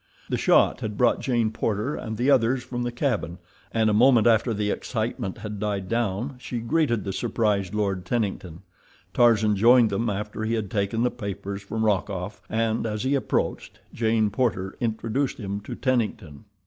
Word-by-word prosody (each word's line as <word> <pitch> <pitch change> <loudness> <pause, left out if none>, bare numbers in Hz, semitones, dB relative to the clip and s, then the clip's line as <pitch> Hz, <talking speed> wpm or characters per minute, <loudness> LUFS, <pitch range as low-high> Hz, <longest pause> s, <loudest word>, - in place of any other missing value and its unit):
The - - 0
shot - - +4
had 105 -1 -4
brought 120 -1 +3
Jane 120 -4 0
Porter 110 +4 -1
and 110 0 -5
the 125 +5 +2
others 125 0 +3
from 120 -1 -5
the 120 0 -2
cabin, 120 - -1 0.3
and 110 -1 +2
a 105 - +3
moment 120 +1 +5
after 115 +1 +4
the 105 -1 -1
excitement 110 -5 -3
had 105 -1 -6
died 100 -2 -2
down 120 +3 -1
she 125 -1 -5
greeted 120 -2 +1
the 95 - -4
surprised 105 -4 0
Lord 100 -3 -1
Tennington. 95 -5 -3 0.5
Tarzan 110 -3 +4
joined 115 +2 +5
them 115 +4 0
after 105 +2 -4
he 110 +1 0
had 105 -3 -3
taken 105 +2 0
the 125 - +2
papers 100 -3 -5
from 110 +3 -2
Rokoff, 100 -1 -1
and, 115 0 0
as 105 0 -3
he 130 +2 +1
approached, 140 - -1 0.2
Jane 110 -2 +1
Porter 100 -4 -1
introduced 115 +3 -1
him 100 -2 -4
to 105 - -7
Tennington. 110 - -2
110 Hz, 175 wpm, -25 LUFS, 100-120 Hz, 0.5 s, moment